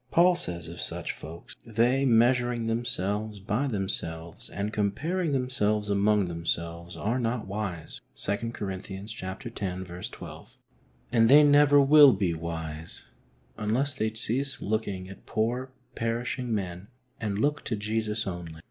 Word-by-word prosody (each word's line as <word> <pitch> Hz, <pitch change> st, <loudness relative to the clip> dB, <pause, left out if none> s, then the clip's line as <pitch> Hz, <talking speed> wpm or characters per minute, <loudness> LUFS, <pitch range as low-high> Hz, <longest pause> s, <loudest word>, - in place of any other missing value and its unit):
Paul 175 Hz, +1 st, +5 dB
says 85 Hz, -, -2 dB
of 85 Hz, +1 st, -5 dB
such -, -, -2 dB
folks: 80 Hz, +2 st, -10 dB
" -, -, -20 dB
They, 120 Hz, +4 st, +2 dB
measuring 120 Hz, 0 st, +3 dB
them 115 Hz, +1 st, -1 dB
selves 105 Hz, -1 st, -1 dB
by 105 Hz, +8 st, -1 dB
themselves, 85 Hz, -7 st, -3 dB
and 100 Hz, +3 st, -3 dB
comparing 150 Hz, -, 0 dB
themselves 110 Hz, -6 st, 0 dB
among 100 Hz, 0 st, +3 dB
themselves, 85 Hz, 0 st, -3 dB
are 115 Hz, +5 st, 0 dB
not 115 Hz, -1 st, -1 dB
wise" 95 Hz, -4 st, -4 dB
(2 105 Hz, +3 st, -2 dB
Cor, 100 Hz, -4 st, -4 dB
x. 95 Hz, +1 st, -7 dB, 0.3 s
12). 95 Hz, -3 st, -6 dB, 0.5 s
And 115 Hz, -1 st, +5 dB
they 145 Hz, +3 st, +9 dB
never 145 Hz, 0 st, +6 dB
will 140 Hz, -1 st, +8 dB
be 95 Hz, -3 st, 0 dB
wise 80 Hz, -2 st, -5 dB, 0.6 s
unless 125 Hz, +7 st, +1 dB
they 110 Hz, -4 st, -1 dB
cease 130 Hz, +5 st, -1 dB
looking 100 Hz, -3 st, -2 dB
at 95 Hz, -, -12 dB
poor, 120 Hz, +4 st, -1 dB, 0.2 s
perishing 120 Hz, +2 st, -2 dB
men 95 Hz, -3 st, -3 dB, 0.3 s
and 105 Hz, -3 st, -2 dB
look 145 Hz, +6 st, +1 dB
to 115 Hz, -, -1 dB
Jesus 105 Hz, +1 st, -1 dB
only. 85 Hz, -4 st, -6 dB
105 Hz, 140 wpm, -28 LUFS, 95-125 Hz, 0.6 s, they